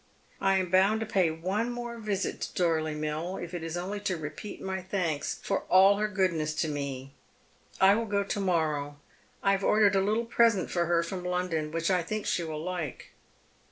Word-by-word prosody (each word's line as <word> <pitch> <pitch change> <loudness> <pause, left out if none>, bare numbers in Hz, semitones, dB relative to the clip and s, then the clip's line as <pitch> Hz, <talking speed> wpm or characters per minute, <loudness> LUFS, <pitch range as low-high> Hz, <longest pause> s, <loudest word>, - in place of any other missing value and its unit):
I 195 0 +3
am 185 -2 -1
bound 195 +4 +4
to - - -1
pay 190 -5 +2
one 185 +9 -2
more 240 -1 -5
visit 210 -3 -2
to - - -4
Dorley 160 -3 +1
Mill, 155 +4 -3
if 175 0 -7
it 175 - -4
js 165 +1 -4
only 195 +4 -4
to 190 -3 -2
repeat 155 +7 -7
my 190 0 -3
thanks 180 -5 -2
for 195 - 0
all 195 +2 +6
her 215 +1 +1
goodness 170 -7 0
to 160 - 0
me. 140 -2 -4 0.7
I 190 +1 +7
will 225 +2 -1
go 200 -1 +1
to 200 +1 -3
morrow. 155 -6 0 0.5
I 195 - +4
have 195 0 0
ordered 205 -1 +4
a - - +4
httle 215 +4 0
present 230 -5 +3
for 175 -1 +1
her 170 0 +2
from 180 +1 -5
London 180 -4 -1
■which 165 +3 0
I 180 -1 +3
think 215 +5 -4
she - - 0
will 155 -1 -5
like." 175 -6 -5
185 Hz, 200 wpm, -29 LUFS, 160-200 Hz, 0.7 s, I